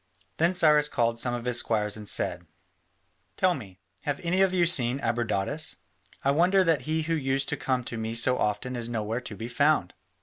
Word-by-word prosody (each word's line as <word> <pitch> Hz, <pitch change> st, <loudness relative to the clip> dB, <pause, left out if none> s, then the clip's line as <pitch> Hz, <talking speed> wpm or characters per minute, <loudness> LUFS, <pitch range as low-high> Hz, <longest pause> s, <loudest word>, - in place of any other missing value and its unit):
Then 170 Hz, +3 st, +2 dB
Cyrus 150 Hz, -3 st, +5 dB
called 115 Hz, -3 st, 0 dB
some 120 Hz, 0 st, 0 dB
of 120 Hz, 0 st, -6 dB
his 125 Hz, -1 st, +3 dB
squires 105 Hz, -2 st, 0 dB
and 105 Hz, -1 st, -5 dB
said: -, -, +2 dB, 0.9 s
"Tell 185 Hz, -1 st, +3 dB
me, 100 Hz, -, -9 dB, 0.2 s
have 145 Hz, -1 st, -3 dB
any 180 Hz, +3 st, +1 dB
of 195 Hz, -1 st, +4 dB
you 180 Hz, -2 st, +2 dB
seen 130 Hz, -6 st, +1 dB
Abradatas? 115 Hz, -5 st, -1 dB, 0.5 s
I 140 Hz, -, +3 dB
wonder 180 Hz, +6 st, +3 dB
that 165 Hz, -6 st, +2 dB
he 160 Hz, 0 st, 0 dB
who 165 Hz, +1 st, -2 dB
used 135 Hz, -3 st, -1 dB
to -, -, 0 dB
come 130 Hz, -2 st, -1 dB
to 115 Hz, -1 st, -6 dB
me 110 Hz, +1 st, -4 dB
so 125 Hz, +2 st, +1 dB
often 105 Hz, +5 st, -2 dB
is 120 Hz, -1 st, -4 dB
nowhere 115 Hz, +1 st, -3 dB
to 110 Hz, -4 st, -8 dB
be 110 Hz, +4 st, -6 dB
found." 140 Hz, -, +1 dB
125 Hz, 200 wpm, -27 LUFS, 115-155 Hz, 0.9 s, Cyrus